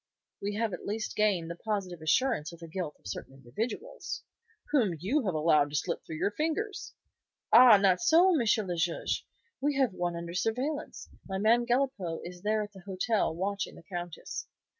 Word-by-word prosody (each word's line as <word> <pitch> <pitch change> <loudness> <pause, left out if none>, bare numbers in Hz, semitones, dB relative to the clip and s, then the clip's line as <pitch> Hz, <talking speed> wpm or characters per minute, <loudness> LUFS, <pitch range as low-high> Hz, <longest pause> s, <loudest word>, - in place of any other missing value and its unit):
"We 205 +1 -2
have 220 -2 -1
at - - -6
least 215 +2 -3
gained 190 -6 +1
the - - -5
positive 185 -3 -3
assurance 155 - +1
of 170 - -12
the 165 - -9
guilt 165 -2 -4
of - - -35
certain 100 +7 -6
individuals." 225 - -5 0.5
"Whom 225 - +3
you 240 - 0
have 180 - 0
allowed 150 -2 +4
to 145 - -6
slip 170 +3 -1
through 160 - -7
your 200 - 0
fingers." 325 - -3 0.6
"Ah, 245 -4 +10
not 190 -2 +3
so, 345 +4 +6
M. 315 - +3 0.3
le 175 - -1
Juge! 165 0 -1 0.3
We 290 +1 +1
have 260 -7 +2
one 175 -1 -2
under 170 0 -5
surveillance. 250 - -2 0.2
My 190 - -2
man 230 +4 +3
Galipaud 240 -10 0
is 175 0 -9
there 215 +1 +1
at 205 - -9
the 195 - -11
hotel 195 -2 0
watching 195 +3 -2
the - - -13
Countess." 175 -2 -6
195 Hz, 180 wpm, -30 LUFS, 170-240 Hz, 0.6 s, Ah